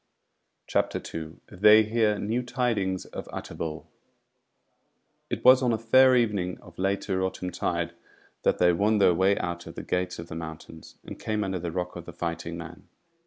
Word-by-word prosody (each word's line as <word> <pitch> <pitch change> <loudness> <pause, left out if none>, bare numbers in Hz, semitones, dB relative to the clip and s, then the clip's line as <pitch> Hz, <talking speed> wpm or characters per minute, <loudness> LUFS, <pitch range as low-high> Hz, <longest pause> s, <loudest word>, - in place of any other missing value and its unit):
CHAPTER - - 0
2 80 -1 -8
They 105 +4 +6
Hear 110 -1 +1
New 110 +5 -1
Tidings 120 -7 -1
of - - -8
Utterbol 80 -1 -6 1.4
It - - -4
was 130 +1 +8
on 125 -2 +2
a 115 - +1
fair 130 +4 +5
evening 100 -7 0
of 90 0 -16
later 95 0 0
autumn 95 -1 -3
tide 85 0 -2 0.5
that - - +2
they 90 0 +4
won 105 +5 +2
their 95 -3 +5
way 95 +3 +3
out 85 -1 -4
of - - -9
the - - -6
Gates 90 0 -2
of 85 - -7
the - - -8
Mountains, 80 0 -9
and - - -9
came 110 -1 -1
under 95 -2 -2
the 85 0 -4
rock 90 +1 -3
of 85 -1 -8
the - - -9
Fighting 85 0 -4
Man. 85 +1 -10
95 Hz, 175 wpm, -27 LUFS, 85-110 Hz, 1.4 s, was